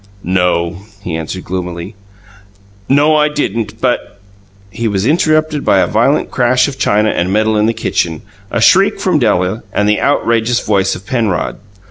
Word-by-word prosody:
"No," 90 Hz, -1 st, 0 dB, 0.3 s
he 85 Hz, -3 st, -4 dB
answered 80 Hz, +3 st, -5 dB
gloomily. 90 Hz, +1 st, -5 dB, 1.0 s
"No, 145 Hz, +3 st, +4 dB
I 150 Hz, 0 st, +3 dB
didn't, 115 Hz, -7 st, -3 dB
but 125 Hz, -5 st, -2 dB, 0.3 s
" 95 Hz, 0 st, -30 dB
He 115 Hz, +3 st, -3 dB
was 100 Hz, -1 st, -1 dB
interrupted 155 Hz, 0 st, +1 dB
by 100 Hz, -, +3 dB
a 95 Hz, -, +3 dB
violent 115 Hz, +10 st, +1 dB
crash 125 Hz, 0 st, +2 dB
of 140 Hz, -2 st, -7 dB
china 105 Hz, +1 st, +2 dB
and 90 Hz, +2 st, -1 dB
metal 110 Hz, +2 st, +1 dB
in 105 Hz, +1 st, +2 dB
the -, -, +2 dB
kitchen, 80 Hz, -7 st, -2 dB, 0.3 s
a -, -, -1 dB
shriek -, -, +4 dB
from -, -, +1 dB
Della, 90 Hz, +5 st, 0 dB
and 105 Hz, -, 0 dB
the 105 Hz, 0 st, +1 dB
outrageous 115 Hz, -3 st, +1 dB
voice 100 Hz, -2 st, +1 dB
of 90 Hz, -, -11 dB
Penrod. 110 Hz, -9 st, -1 dB
105 Hz, 165 wpm, -14 LUFS, 95-125 Hz, 1.0 s, No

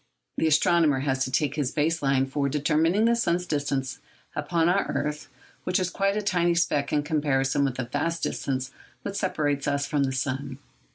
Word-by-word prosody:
The 160 Hz, -, +2 dB
astronomer 155 Hz, -2 st, +3 dB
has 135 Hz, -2 st, 0 dB
to 130 Hz, -, -5 dB
take 140 Hz, +1 st, +1 dB
his 145 Hz, -4 st, 0 dB
base 160 Hz, +3 st, 0 dB
line 135 Hz, -1 st, +2 dB
for 140 Hz, +1 st, -1 dB
determining 160 Hz, +8 st, +2 dB
the 235 Hz, 0 st, +4 dB
sun's 180 Hz, -6 st, 0 dB
distance, 140 Hz, -5 st, -2 dB, 0.4 s
upon 165 Hz, +2 st, +1 dB
our 185 Hz, +3 st, +2 dB
earth, 150 Hz, +1 st, -3 dB, 0.4 s
which 180 Hz, +1 st, +1 dB
is 180 Hz, -1 st, -1 dB
quite 195 Hz, +1 st, 0 dB
a 210 Hz, -, -1 dB
tiny 175 Hz, -3 st, +2 dB
speck 150 Hz, -4 st, +1 dB
in 150 Hz, -1 st, +1 dB
comparison 145 Hz, -3 st, +1 dB
with 135 Hz, -2 st, -1 dB
the 130 Hz, -, -2 dB
vast 155 Hz, +7 st, -2 dB
distance 130 Hz, -1 st, -2 dB, 0.3 s
which 200 Hz, -, -4 dB
separates 145 Hz, -8 st, -1 dB
us 140 Hz, 0 st, 0 dB
from 145 Hz, -2 st, +1 dB
the 135 Hz, -, -1 dB
sun. 130 Hz, +1 st, -3 dB
150 Hz, 185 wpm, -26 LUFS, 135-170 Hz, 0.4 s, the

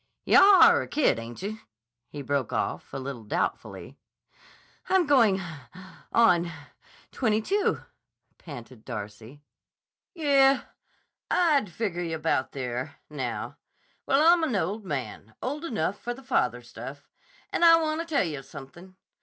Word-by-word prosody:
"Yah 395 Hz, -1 st, +7 dB
are -, -, +6 dB
a -, -, -6 dB
kid, 285 Hz, -, +1 dB
ainche?" 185 Hz, -, -7 dB, 0.5 s
he 145 Hz, -1 st, -7 dB
broke 140 Hz, -3 st, -1 dB
off, -, -, -3 dB
a -, -, -5 dB
little 130 Hz, -3 st, -6 dB
doubtfully. 105 Hz, -, -4 dB, 0.9 s
"I'm 375 Hz, -2 st, +3 dB
going—on—twenty 225 Hz, -9 st, +3 dB, 2.0 s
two," 400 Hz, -, 0 dB, 0.6 s
panted 125 Hz, -6 st, -11 dB
Darcy. 110 Hz, +4 st, -8 dB, 0.7 s
"Yeh, 275 Hz, -4 st, +4 dB, 0.7 s
I'd 295 Hz, -, +2 dB
figure 180 Hz, -2 st, -3 dB
yah 165 Hz, -2 st, -3 dB
about 155 Hz, -5 st, -1 dB
there—now. 130 Hz, 0 st, -5 dB, 0.5 s
Well, 275 Hz, +2 st, +3 dB
I'm 345 Hz, -2 st, +1 dB
an 260 Hz, -8 st, 0 dB
old 200 Hz, +4 st, -2 dB
man; 125 Hz, -, -6 dB
old 290 Hz, +5 st, -4 dB
enough 205 Hz, -, -2 dB
for 240 Hz, 0 st, -4 dB
the 270 Hz, -, -14 dB
father 125 Hz, -, 0 dB
stuff. 135 Hz, +4 st, -10 dB, 0.4 s
And -, -, -1 dB
I 330 Hz, -1 st, +8 dB
wanta 315 Hz, +1 st, -2 dB
tell 315 Hz, -4 st, +1 dB
yah 150 Hz, -6 st, -4 dB
something. 155 Hz, +8 st, -12 dB
175 Hz, 120 wpm, -27 LUFS, -, 2.0 s, I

